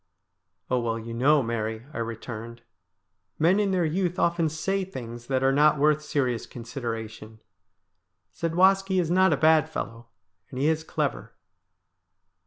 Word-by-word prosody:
' 90 +2 -51
Oh, 125 - +3
well, 115 -1 -1
you 115 +1 -7
know, 140 +4 +3
Mary,' 110 0 -3
I - - -5
returned, 115 0 -6 0.4
' - - -54 0.3
men 175 +6 +3
in 205 -1 +1
their 185 -3 +1
youth 180 +3 -1
often 170 -2 +1
say 195 +6 -1
things 120 -9 -8
that 130 -1 0
are 135 - +4
not 150 +2 +4
worth 150 +1 +3
serious 130 -6 -1
consideration. 115 -2 -7 0.9
Zadwaski 190 +3 +2
is 170 -2 0
not 185 0 +4
a - - +2
bad 155 0 +4
fellow, 115 -6 -6 0.4
and 130 - -9
he 140 +3 +1
is 160 0 0
clever.' - - -3
140 Hz, 155 wpm, -26 LUFS, 115-165 Hz, 0.9 s, are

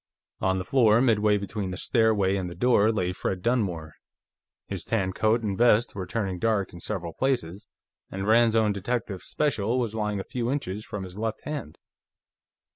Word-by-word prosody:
On 95 0 +1
the 90 - -3
floor, 115 -2 +4
midway 105 -4 +3
between 100 -1 -4
the 90 - -5
stairway 110 -5 +2
and 95 -2 -2
the 85 - -9
door, 115 -3 +3
lay 90 -5 -1
Fred 90 0 -3
Dunmore. 90 - -1 0.7
His - - -5
tan 95 -5 -1
coat 110 +4 +1
and 100 -3 -1
vest 115 +1 +3
were 95 -3 -5
turning 95 -5 -2
dark 110 -3 0
in 85 - -9
several 85 -3 -4
places, 105 -7 -2 0.4
and 95 +1 -4
Rand's 115 0 +4
own 110 -2 +3
Detective 100 -1 -3
Special 125 -6 -1
was 115 -4 -1
lying 105 -2 -2
a - - -3
few 120 +2 -3
inches 105 -7 -3
from 105 -3 -6
his 95 +2 -9
left 110 0 -3
hand. 145 - -6
105 Hz, 180 wpm, -26 LUFS, 95-115 Hz, 0.7 s, floor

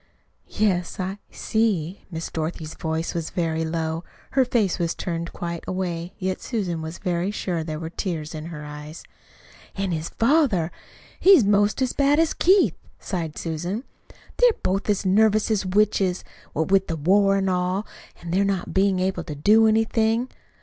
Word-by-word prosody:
"Yes, 185 -5 0
I 190 +2 -3
see." 205 -6 -1
Miss 165 -2 -5
Dorothy's 160 0 -4
voice 160 0 -3
was 165 -2 -3
very 160 -2 -1
low. 160 0 -2 0.3
Her 270 - +4
face 220 -7 +1
was 170 -1 0
turned 170 -1 -4
quite 170 -1 -5
away, 180 -2 -3
yet 185 -1 -2
Susan 185 -9 -2
was 160 +1 -6
very 180 -1 -1
sure 185 -4 -2
that 160 - -5
there 155 -1 -3
were 160 0 -6
tears 165 -5 -4
in 155 0 -6
her 150 -3 -7
eyes. 150 +2 -9 0.7
"An' 195 -1 -1
his 160 0 -2
father! 230 - +2 0.5
he's 370 - +7
'most 205 +5 +3
as 255 - -1
bad 285 +1 +3
as 325 -1 +3
Keith," 380 +2 +4 0.3
sighed 165 -5 -4
Susan. 175 +8 -3 0.5
"They're - - +6
both 195 +3 0
as 205 -1 +1
nervous 215 +3 +3
as 200 -3 0
witches, 190 -2 +2 0.3
what 160 +4 -1
with 195 -1 +4
the 165 - -2
war 195 +5 +4
an' 195 0 0
all, 185 +2 0 0.3
an' 170 - -7
they 190 +3 +3
not 195 -2 -1
bein' 190 0 +3
able 190 +1 -1
to 150 - -6
do 215 +9 +5
anything. 225 +2 +2
185 Hz, 170 wpm, -24 LUFS, 165-210 Hz, 0.7 s, he's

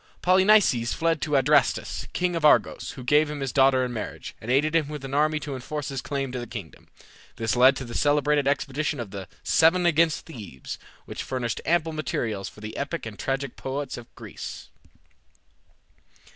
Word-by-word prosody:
Polynices 185 - +4
fled 165 -2 0
to 150 -2 0
Adrastus, 145 +2 +2
king 180 -1 0
of 165 - -2
Argos, 150 - +3
who 130 - -8
gave 150 +4 +3
him 150 -1 -5
his 135 -2 -2
daughter 135 -1 +4
in 125 - -5
marriage, 110 - -6
and 110 - -8
aided 150 +5 +2
him 160 -3 +3
with 150 -2 -6
an 135 - -7
army 155 +1 +2
to 145 -2 -6
enforce 135 +3 -5
his 135 -2 -4
claim 135 -2 -3
to 125 - -4
the 120 - -6
kingdom. 90 -7 -9 0.5
This 115 +1 -1
led 130 +2 +6
to 135 - -5
the 120 - -8
celebrated 145 +1 +2
expedition 145 +1 -1
of 115 -5 -5
the 95 -2 -7 0.2
"Seven 175 +2 +4
against 165 -1 +2
Thebes," 105 - -8 0.3
which - - -6
furnished 120 -4 -3
ample 165 -1 +2
materials 110 -9 -3
for 105 - -16
the 110 +1 -7
epic 145 +2 -3
and 110 -2 -8
tragic 135 +1 -2
poets 135 +1 -4
of 120 - -10
Greece. - - -8
140 Hz, 185 wpm, -25 LUFS, 125-155 Hz, 0.5 s, led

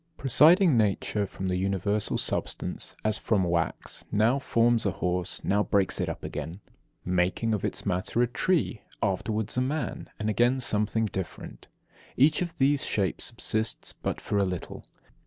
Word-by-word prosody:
23. - - -17
Presiding 155 - +6
nature 105 -1 +1
from 95 0 -5
the 90 0 0
universal 100 +2 0
substance, - - -2
as 110 0 +1
from 105 -4 +1
wax, 85 -2 -1
now 115 +6 +3
forms 115 -3 +2
a 100 - 0
horse, 90 0 -1
now 100 +1 +2
breaks 100 -2 +1
it - - -1
up - - -6
again, 80 +5 -5 0.5
making 90 +5 +1
of 105 - -2
its - - -2
matter 95 +3 -1
a - - +4
tree, 140 - 0 0.2
afterwards 105 +4 -1
a - - +3
man, 145 +4 -3
and 105 - -2
again 120 +4 +2
something 110 -1 +1
different. 95 -5 -6 0.5
Each 145 +7 +4
of 170 -2 -4
these 140 +1 +2
shapes 100 -3 -1
subsists 110 -2 -1
but - - -4
for 100 - -1
a - - +3
little. 90 -2 -5
105 Hz, 160 wpm, -27 LUFS, 95-120 Hz, 0.5 s, Presiding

